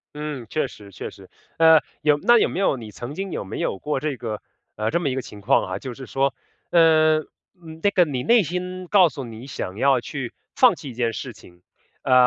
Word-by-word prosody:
嗯， 150 -4 -5
确 155 - 0
实 105 -5 -14
确 - - -6
实。 - - -15 0.3
呃， 160 -1 +7 0.2
有 150 -1 +4
那 240 +11 +5
有 - - +3
没 - - -4
有 190 -8 +2
你 110 -3 -9
曾 120 +6 -7
经 195 +3 -4
有 - - -3
没 95 - -6
有 - - -1
过 150 +7 -2
这 145 -1 -3
个 110 -3 -5 0.3
呃， 110 +1 -1
这 170 - +1
么 160 -5 0
一 130 - -2
个 130 - -1
情 105 -4 -11
况 125 +8 +3
啊， - - -4
就 130 -2 -6
是 130 +2 -9
说， 135 +1 0 0.4
呃， 155 -2 +5 0.6
那 205 - +5
个 180 -3 +5
你 130 -5 -3
内 235 - +5
心 180 +2 -4
告 185 -2 +5
诉 135 -1 -7
你 115 +1 -9
想 95 -7 -5
要 135 +1 +4
去 125 0 -6 0.2
放 - - +6
弃 140 - -9
一 - - -8
件 115 -1 -1
事 125 0 -6
情， 90 -4 -18 0.4
呃， 130 - +2
140 Hz, 245 characters per minute, -23 LUFS, 120-160 Hz, 0.6 s, 呃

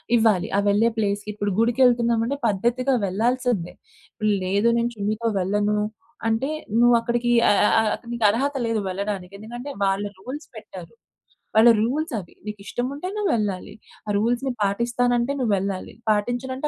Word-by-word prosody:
ఇవ్వాలి. 220 -6 +3
ఆ - - +4
వెళ్ళే 210 +3 +4
ప్లేస్‌కి. 205 0 -1
ఇప్పుడు 205 -1 -2
గుడికేళ్తున్నామంటే 235 +1 +3
పద్ధతిగా 240 +6 +1
వెళ్ళాల్సిందే. 230 -1 0 0.7
లేదు 200 +5 +1
"నేను 235 +1 +1
చున్నీతో 215 +3 -2
వెళ్ళను" 205 +3 +1 0.5
అంటే 225 +6 0 0.3
నువ్వు 240 0 +6
అక్కడికి 240 +1 -1 0.2
అ - - +6 0.2
అ - - +3
అ - - +4
అక్కడ 235 - -14
నీకరహత 235 +6 +1
లేదు 225 -1 0
వెళ్ళడానికి. 195 -1 -4
ఎందుకంటే 240 +6 -8
వాళ్ళ 195 +1 +1 0.2
రూల్స్ 265 +9 -7
పెట్టారు. - - -10 0.6
వాళ్ళ 225 +2 +7
రూల్స్ 290 +6 -1
అవి 175 - -12
నీకు 210 -1 -6
ఇష్టం 245 +5 -2
ఉంటే 300 +6 -5
నువ్వు 415 -2 0
వెళ్ళాలి. 205 -2 -3 0.3
ఆ - - -4
రూల్స్‌‌ని 245 +4 0
పాటిస్తానంటే 240 +5 +1
నువ్వెళ్ళాలి, 200 -4 -1 0.2
పాటించనంటే 245 +6 -1
230 Hz, 140 wpm, -23 LUFS, 205-245 Hz, 0.7 s, వాళ్ళ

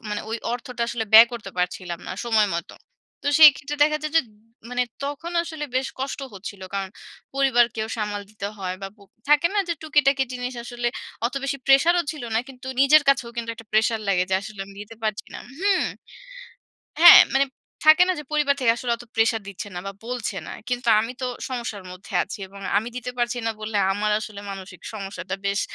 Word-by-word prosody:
মানে 210 - -2
ওই 225 - -1 0.2
অর্থটা 245 0 -4
আসলে 230 -2 -2
ব্যয় 225 +2 +11
করতে 230 -5 -7
পারছিলাম 180 -1 -2
না - - -4
সময় 220 -3 +3
মত। 170 - -3 0.5
তো - - -7
সেই 310 -1 +11
ক্ষেত্রে 290 +2 -6
দেখা 305 +1 +4
যায় 305 0 -4
যে - - +7
উ - - -24 0.4
মানে 250 0 +1 0.2
তখন 290 +5 -5
আসলে 315 -3 -6
বেশ 265 +1 0
কষ্ট 275 +1 -3
হচ্ছিল। 195 0 -8
কারণ 195 -1 -2 0.5
পরিবারকেও 240 -5 +2
সামাল 210 -1 -3
দিতে 205 -2 -6
হয় 185 -1 -3
বা 195 - -4
প - - -34 0.3
থাকে 295 +3 +5
না - - +2
যে 340 - 0
টুকিটাকি 280 -3 +3
জিনিস, 250 0 -4
আসলে 240 0 -2 0.4
অত 255 - -6
বেশি 275 0 -2
প্রেশার 275 +6 +5
ও - - -1
ছিল 300 - -9
না। - - +3
কিন্তু 260 -1 -12
নিজের 295 +2 +6
কাছেও 265 -4 +3
কিন্তু 230 -1 -3
একটা 225 0 -13
প্রেশার 220 +1 +2
লাগে 180 -2 +2
যে - - +3
আসলে 200 0 -9
আমি 200 - -14
দিতে 210 +2 -10
পারছি 215 -1 -2
না - - -5 0.2
হুম? 390 0 +2 1.2
হ্যাঁ 345 - +12
মানে 275 +1 +4 0.4
থাকে 310 +3 +8
না - - +3
যে - - -7
পরিবার 295 -2 +2
থেকে 230 -2 +5
আসলে 245 -1 -2
অত 240 - -11
প্রেশার 225 -1 +2
দিচ্ছে 200 +1 -7
না 175 - -3
বা - - -3
বলছে 245 -2 -3
না। - - -6 0.2
কিন্তু 245 0 -3
আমি 225 +3 -2
তো - - -1 0.2
সমস্যার 235 -6 -5
মধ্যে 185 +1 -12
আছি। 205 - -8
এবং 200 +1 -13 0.2
আমি 220 +3 -1
দিতে 250 0 -5
পারছি 240 0 0
না - - +1
বলে 215 -1 -2 0.2
আমার 210 +1 0
আসলে 210 -2 -8
মানসিক 190 -1 -9
সমস্যাটা 195 -2 -5
বেশ 200 +1 +1
235 Hz, 205 wpm, -23 LUFS, 205-275 Hz, 1.2 s, হ্যাঁ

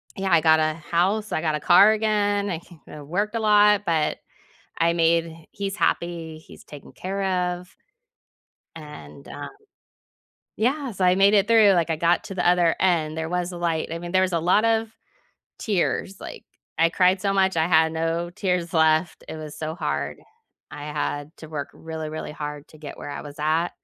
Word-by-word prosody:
Yeah, 190 -1 -2
I 170 -2 +5
got 160 0 +5
a 155 0 +1
house, 180 +6 -1
I - - -1
got 155 -2 0
a - - -3
car 185 +7 +6
again, 205 -2 0
I 170 -4 -3 0.3
ca 150 - -10
worked 200 +10 -2
a - - 0
lot, 210 -1 +4
but 160 -3 0 0.6
I 170 0 +2
made 165 -1 0
he's 195 0 -4
happy, 170 -5 -2
he's 155 - -15
taken 145 -1 -13
care 195 +2 -4 0.3
of 180 +1 -16 1.0
and, 150 -2 -11
um 145 - -7 1.1
Yeah, 265 +4 -1
so 190 -3 -1
I 180 - +5
made 200 +2 +5
it 200 -1 +3
through, 220 -3 +6
like, 170 -2 +1
I - - +1
got 170 +1 +2
to 195 - -7
the 180 -1 0
other 175 -2 +3
end, 165 -4 +1
there 160 0 -3
was 180 +1 -2
a 175 - -7
light, 165 -2 -1
I 165 - -4
mean, 175 0 -7
there 185 0 +3
was 185 -1 -1
a 170 - +2
lot 180 +6 +3
of 225 0 +1 0.7
tears, 195 -1 -1
like, - - -9 0.3
I 165 +1 +4
cried 185 +1 +3
so 200 0 0
much, 190 -2 +2
I 160 0 +2
had 160 -2 +3
no 165 +1 -2
tears 180 -2 -2
left, 160 +1 +2
it - - -6
was 155 -1 -8
so 155 0 -4
hard. - - -3 0.5
I 145 - -8
had 145 +1 -3
to 160 - -11
work 145 -2 -5
really, 160 -1 -7
really 155 - -6
hard 150 0 -7
to 155 - -17
get 150 -2 -9
where - - -7
I 145 - -6
was 145 -1 -10
at, 160 +3 +1
170 Hz, 195 wpm, -24 LUFS, 160-195 Hz, 1.1 s, car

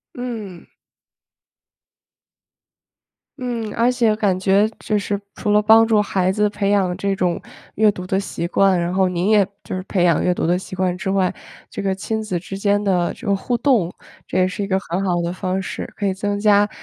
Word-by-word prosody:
嗯。 220 -8 -6 2.7
嗯， 235 -4 -4
而 235 +2 +3
且 235 -4 +2
感 205 -4 +1
觉 195 +3 +3
就 215 - -1
是 200 0 -2
除 210 - -2
了 210 0 +5
帮 220 +2 +6
助 220 -2 +3
孩 190 -3 0
子 210 +2 +2
培 205 -1 -1
养 190 -3 +1
这 195 +1 -1
种 180 -3 0 0.3
阅 215 0 +4
读 185 -2 -7
的 190 +1 0
习 180 -3 -4
惯， 190 +1 +3
然 175 +1 -1
后 190 -1 +3
您 180 +1 -1
也 210 -2 +5 0.2
就 - - -5
是 185 - -3
培 180 -3 +1
养 170 -3 +3
阅 180 - +2
读 175 - -1
的 175 +2 +2
习 185 0 -7
惯 180 -1 0
之 185 +2 -3
外， 190 -2 +1 0.3
这 - - -6
个 195 -1 0
亲 220 +3 -3
子 190 -5 -2
之 190 +3 -7
间 205 +1 +1
的 180 -4 +1
这 230 - -11
个 200 - +3
互 235 +5 -1
动， 230 -9 +2 0.4
这 - - -1
也 185 - +4
是 185 +2 -4
一 200 - -3
个 190 -1 +2
很 190 0 -3
好 175 -2 +1
的 170 0 -2
方 185 +1 -2
式， 190 - -6
可 205 - -2
以 190 - 0
增 205 +1 -2
加 205 0 +4
195 Hz, 225 characters per minute, -20 LUFS, 185-210 Hz, 2.7 s, 帮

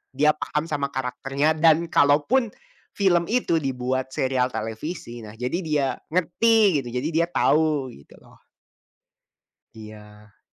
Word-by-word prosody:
dia 150 +3 +4
paham 150 +1 -3
sama 140 -2 -1
karakternya 135 +4 -1
dan 165 +1 +4
kalaupun, 155 - +3 0.4
film 175 -4 +2
itu 220 -8 +1
dibuat 130 -2 -2
serial 130 -1 +1
televisi 120 +2 -6
nah 110 -1 -11
jadi 125 +8 -3
dia 150 -6 0 0.2
ngerti 195 +1 +3
gitu, 125 - -10
jadi 145 - -3
dia 170 +1 +1
tahu 155 -5 +1
gitu 70 - -17
loh. - - -22 1.3
Iya. 105 -1 -14
145 Hz, 125 wpm, -23 LUFS, 125-165 Hz, 1.3 s, dia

